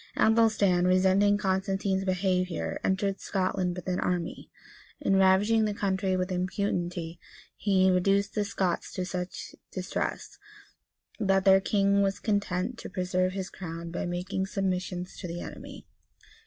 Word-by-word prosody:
Athelstan, 215 -5 +4
resenting 190 +2 +4
Constantine's 195 -1 0
behavior, 185 -1 -1
entered 195 0 0
Scotland 185 -2 -1
with 180 - -8
an 180 -1 0
army, 175 -2 -2 0.5
and 195 -9 +2
ravaging 205 +4 +4
the 210 -1 -2
country 190 -2 0
with 185 +1 -2
impunity,[] 180 -2 -2 0.4
he 190 -2 +3
reduced 195 +3 +2
the 210 - 0
Scots 190 -3 -2
to 185 - -2
such 180 0 -5 0.2
distress, - - -4 0.8
that 195 -2 +2
their 195 0 +7
king 200 0 +2
was 195 0 +1
content 205 +1 -1
to - - -7
preserve 185 -1 0
his 190 -1 -4
crown 165 -2 -7
by 175 - -3
making 190 +2 -2
submissions 185 -3 -2
to 180 - -6
the 170 +1 -5
enemy. - - -9
190 Hz, 135 wpm, -28 LUFS, 180-200 Hz, 0.8 s, their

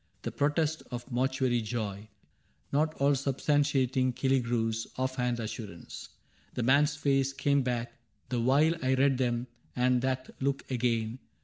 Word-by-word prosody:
The - - -3
protest 150 +2 0
of 120 0 -5
a 130 - -10
mortuary 130 -1 +1
joy 105 -2 -4 0.6
Not 155 +2 +1
all 140 +1 +3
substantiating 135 -2 +1
Killigrew's 115 -4 0
Off 130 0 -1
hand 125 -1 0
assurance. 110 -6 -7 0.5
The 125 - -1
man's 145 +4 +4
face 135 -2 +1
came 140 0 +2
back 120 -2 -2 0.4
The 125 -2 0
while 140 +7 +4
I 130 0 +3
read 135 0 +3
them, 120 -1 0 0.3
and 125 0 +2
that 130 0 -2
look 135 +1 0
again. 115 -1 0
130 Hz, 140 wpm, -30 LUFS, 120-140 Hz, 0.6 s, man's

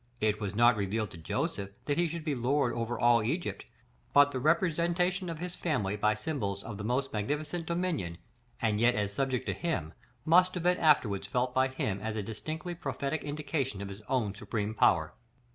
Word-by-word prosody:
It 110 0 +1
was 100 -1 -3
not 120 +1 +5
revealed 105 +1 -1
to - - -10
Joseph 95 +4 -2 0.2
that 145 - +1
he 175 - +3
should 165 0 -5
be 150 - 0
lord 130 0 +1
over 120 0 -2
all 120 -1 +5
Egypt; 150 +11 -2 0.5
but 145 0 +7
the 130 - -2
representation 175 +4 +1
of 165 - -4
his 180 +2 -5
family 115 - -1
by 105 +1 +2
symbols 105 -6 -3
of 105 -3 -7
the - - -4
most 130 +5 -1
magnificent 150 +10 -2
dominion, 170 - -1 0.4
and 110 -2 +1
yet 120 +1 +5
as 105 -1 -1
subject 130 +1 -1
to - - -1
him, 90 - -2 0.3
must 180 +3 +5
have 175 - -3
been 180 +1 +3
afterwards 125 -11 +3
felt 125 0 0
by 130 +1 +3
him 110 -7 -2
as 110 +1 -3
a 105 - -2
distinctly 155 - -5
prophetic 155 -3 -3
indication 145 -6 -2
of 100 0 -5
his 100 +1 -8
own 115 -7 +1
supreme 105 0 -3
power. - - +3
130 Hz, 195 wpm, -30 LUFS, 105-160 Hz, 0.5 s, but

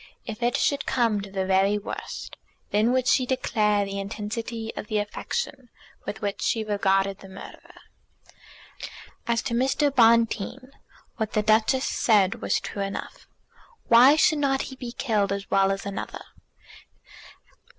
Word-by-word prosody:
If 220 +2 -7
it 240 0 +1
should 285 - 0
come 230 -5 +1
to 200 - -8
the 190 -1 -2
very 195 +2 +3
worst, 205 - -7 0.4
then 215 +3 +3
would 255 0 +1
she 255 -1 +3
declare 210 -5 +1
the 200 0 -5
intensity 220 +3 -5
of - - -6
the 215 - -1
affection 250 - -4 0.4
with 205 - -5
which 200 -1 -3
she 225 - 0
regarded 195 -2 +1
the 195 - -13
murderer. 190 - -12 1.5
As 235 -1 +1
to - - -3
Mr. 270 +3 +1
Bonteen, 230 +2 +2 0.5
what 220 -3 -3
the 215 - +1
Duchess 220 +5 +3
said 200 -5 +2
was - - +1
true 200 - -6
enough; 195 0 -6 0.6
why 250 +5 +8
should 310 0 +3
not 270 -2 +1
he - - -9
be 250 -2 -7
killed 210 -7 0
as 200 0 -4
well 195 0 +3
as 195 0 -4
another? 200 -1 -6
220 Hz, 150 wpm, -25 LUFS, 200-245 Hz, 1.5 s, why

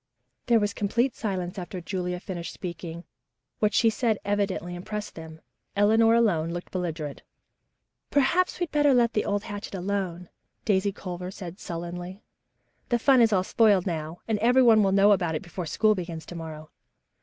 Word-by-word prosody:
There 235 -2 +5
was 205 -1 0
complete 235 +6 0
silence 190 -2 -3
after 180 +1 -6
Julia 180 0 -3
finished 175 -2 -6
speaking. 170 -2 -7 0.6
What 210 -1 +2
she 230 - +5
had - - -3
said 225 -3 +1
evidently 200 -3 -1
impressed 210 +4 -5
them. 160 -1 -10 0.3
Eleanor 225 +3 +5
alone 180 -9 +2
looked 175 +1 -6
belligerent. 165 -5 -4 0.9
"Perhaps 350 +7 +2
we'd 350 -3 -2
better 290 -3 +4
let 235 -1 +3
the 210 - 0
old 205 0 -1
hatchet 205 -1 -6
alone," 180 -2 -3 0.4
Daisy 200 -1 +2
Culver 180 -2 -6
said 185 -1 -8
sullenly. 175 +3 -6 0.7
"The 240 - +3
fun 260 +1 +5
is 225 -1 +5
all 185 -3 +3
spoiled 205 -2 +3
now, 160 -2 -3
and 220 -2 0
everyone 235 -1 +5
will 195 -2 +3
know 200 +1 +5
about 175 -5 +2
it 155 - -3
before 175 -1 -6
school 215 +6 +3
begins 170 -5 -6
to 175 - -9
morrow." 155 -2 -8
195 Hz, 165 wpm, -26 LUFS, 175-215 Hz, 0.9 s, There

